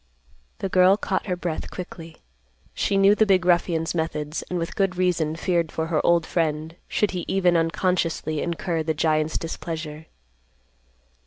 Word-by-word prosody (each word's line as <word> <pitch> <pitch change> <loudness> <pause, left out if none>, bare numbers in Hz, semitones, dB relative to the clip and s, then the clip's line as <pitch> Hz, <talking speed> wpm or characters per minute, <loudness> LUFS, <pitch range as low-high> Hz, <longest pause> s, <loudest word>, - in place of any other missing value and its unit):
The - - -2
girl 185 +1 +5
caught 195 -1 -2
her 180 - 0
breath 175 -3 -4
quickly. 170 -3 -8 0.6
She 195 - 0
knew 195 +1 +6
the 215 +1 +3
big 185 -2 +3
ruffian's 170 -2 +2
methods, 155 -2 -2
and 180 - -2
with 165 -1 -3
good 195 -2 +1
reason 170 -4 +1
feared 170 -2 0
for 160 - -2
her 160 -2 0
old 170 -1 +3
friend, 160 -1 -1
should 210 - +1
he 180 -2 -3
even 180 -2 +2
unconsciously 165 -2 0
incur 170 -1 -2
the 160 0 -1
giant's 155 0 +1
displeasure. 160 -2 -6
170 Hz, 155 wpm, -24 LUFS, 160-180 Hz, 0.6 s, knew